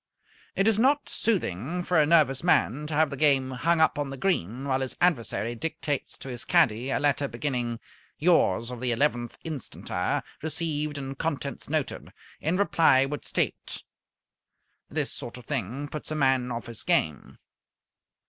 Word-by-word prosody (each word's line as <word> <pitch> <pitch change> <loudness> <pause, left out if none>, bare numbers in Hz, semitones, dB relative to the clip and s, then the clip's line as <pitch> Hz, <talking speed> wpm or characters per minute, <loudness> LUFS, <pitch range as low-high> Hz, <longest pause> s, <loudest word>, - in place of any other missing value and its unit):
It 195 - +2
is 220 -1 +3
not 280 +5 +3
soothing 175 - -1
for 175 -2 +2
a 150 - +4
nervous 145 -4 +4
man 150 -4 +2
to 155 - -3
have 155 -1 +3
the - - -3
game 135 -2 +3
hung 165 +6 +1
up 160 -2 +3
on 145 -1 -1
the 135 - -6
green 130 - -1
while 135 -1 +1
his 130 - -3
adversary 120 -8 +1
dictates 145 +1 -3
to - - -9
his 120 -2 -5
caddy 120 +4 +3
a - - +1
letter 145 -1 +1
beginning 120 -3 -2 0.4
"Yours 125 - +3
of 125 -1 -7
the 125 -1 0
11th 120 -2 0
inst. 155 -6 -5 0.6
received 150 -1 -1
and 135 -1 -6
contents 145 -4 -3
noted. 155 -3 -2 0.3
In 165 +4 0
reply 160 -9 +4
would 145 +2 -5
state - - -2 0.5
" - - -57 0.3
This - - -2
sort 120 - -7
of 125 - -12
thing 135 +1 -3
puts 150 0 -6
a 155 - -2
man 130 -3 +2
off 115 0 -4
his 115 -2 -7
game. 75 -3 0
140 Hz, 165 wpm, -27 LUFS, 125-160 Hz, 0.6 s, a